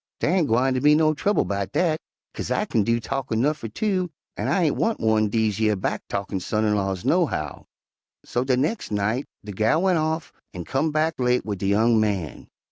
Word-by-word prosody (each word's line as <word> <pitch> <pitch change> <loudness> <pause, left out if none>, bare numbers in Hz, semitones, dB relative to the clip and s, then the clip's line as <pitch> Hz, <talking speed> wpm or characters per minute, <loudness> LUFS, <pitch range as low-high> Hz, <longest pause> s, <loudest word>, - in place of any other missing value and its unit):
'Dar 155 - +1
ain' 175 -5 +2
gwine 125 +4 +2
be 150 +3 +5
no 155 0 +3
trouble 205 +7 +1
'bout 100 -1 -3
dat, 160 -3 +1 0.3
'kase - - -5
I - - 0
kin 110 - +1
do 115 +3 +1
talkin' 115 -1 -2
'nuff 150 +5 +1
fer 115 - -5
two, 185 - -1 0.3
an' - - -3
I 190 - +2
ain' 155 - +2
want 225 0 0
one 110 -1 +2
dese 110 -1 0
yer 110 -1 +2
back 95 - -2
talkin' 100 -1 -3
son 105 +4 -1
in 105 - +2
laws, 95 -3 -2
nohow.' - - 0 0.6
"So 120 - -1
de 130 -1 +1
nex' 155 - -1
night 105 +6 -1 0.2
de 105 - -6
gal 110 - +1
went 185 -3 +3
off 160 0 -2 0.2
an' 90 -2 -5
comed 150 +4 0
back 155 0 0
late 125 0 +1
wid 100 -3 -4
de 95 - -1
young 110 +3 +3
man. 100 -8 -2
120 Hz, 210 wpm, -24 LUFS, 105-155 Hz, 0.6 s, be